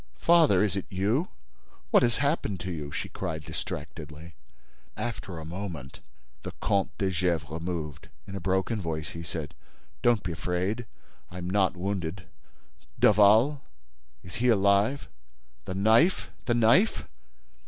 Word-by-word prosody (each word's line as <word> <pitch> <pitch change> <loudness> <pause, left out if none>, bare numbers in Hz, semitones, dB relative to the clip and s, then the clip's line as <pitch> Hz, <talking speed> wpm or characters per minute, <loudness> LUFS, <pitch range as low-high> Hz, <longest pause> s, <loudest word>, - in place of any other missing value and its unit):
—Father!—Is 105 - +4
it 95 - -3
you? 105 - 0 0.6
What - - +6
has 120 -1 +2
happened 140 - 0
to 95 - -4
you?" 75 -4 -5
she - - -3
cried, 80 -5 -5
distractedly. 75 +3 -7 0.6
After 105 -5 -4
a 80 - -7
moment, 85 -6 -6 0.4
the - - -7
Comte 100 -1 0
de 95 -1 0
Gesvres 85 -4 -1
moved. 80 -5 -5 0.2
In 100 - -8
a - - -3
broken 95 +4 0
voice, 80 -3 -3
he 85 +2 -7
said: 80 -3 -5 0.5
"Don't 120 -3 +3
be 90 - -3
afraid—I 90 +3 -5
am 90 -1 -5
not 95 0 +1
wounded—Daval?—Is 85 - 0
he 125 +3 +1
alive?—The 95 - 0
knife?—The 115 - +2
knife? 120 - +4
95 Hz, 120 wpm, -28 LUFS, 80-105 Hz, 0.6 s, What